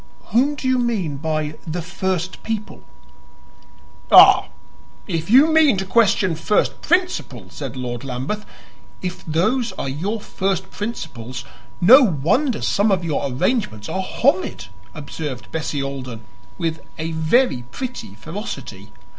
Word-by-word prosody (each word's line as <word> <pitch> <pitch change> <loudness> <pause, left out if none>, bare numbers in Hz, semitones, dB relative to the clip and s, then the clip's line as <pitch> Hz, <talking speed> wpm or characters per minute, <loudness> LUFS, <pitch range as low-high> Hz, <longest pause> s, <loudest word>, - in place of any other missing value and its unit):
"Whom 275 +6 +3
do 265 - -4
you 255 -1 +3
mean 205 - -1
by 155 0 -3
the 165 +1 -3
first 185 0 -3
people?" 220 -2 -5 1.3
"Ah, - - +9 0.6
if 165 - -3
you 280 +7 +6
mean 305 -9 +5
to 190 - -2
question 195 -3 +3
first 205 +6 0
principles!" 310 - -1
said 135 -3 -6
Lord 120 -1 -4
Lambeth. 135 +11 -4 0.6
"If 180 -1 -4
those 220 +10 +1
are - - -4
your 185 +12 -2
first 190 -2 -2
principles, 130 - -6 0.3
no 245 +11 +8
wonder 215 - +1
some 205 +1 +2
of 180 -3 +1
your 150 -3 -1
arrangements 125 - -1
are 190 - -1
horrid," 185 - 0 0.3
observed 145 -3 -6
Bessie 150 -3 -2
Alden 130 -4 -6 0.4
with 160 -1 -2 0.2
a 160 +1 -3
very 160 - +2
pretty 245 - -6
ferocity. 195 - -7
175 Hz, 130 wpm, -21 LUFS, 140-225 Hz, 1.3 s, Ah